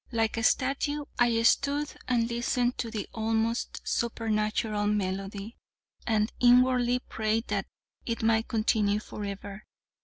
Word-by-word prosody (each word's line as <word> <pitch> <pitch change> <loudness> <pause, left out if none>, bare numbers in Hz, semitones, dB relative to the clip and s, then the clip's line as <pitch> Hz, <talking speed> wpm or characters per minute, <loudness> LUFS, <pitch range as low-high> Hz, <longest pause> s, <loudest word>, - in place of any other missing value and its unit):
Like 225 -2 0
a 230 - -2
statue, 280 +3 +1
I 240 -2 +4
stood 285 +5 +2
and 235 -2 +2
listened 240 +1 0
to 230 - -2
the 215 -3 -4
almost 225 +1 -1
supernatural 215 -2 0
melody, 195 +1 -3 0.5
and 215 -1 +1
inwardly 250 0 +5
prayed 220 +1 -1
that - - -1 0.4
it 230 -1 -2
might 225 0 +2
continue 215 -2 +1
forever. 200 -1 -7
225 Hz, 120 wpm, -28 LUFS, 215-245 Hz, 0.5 s, inwardly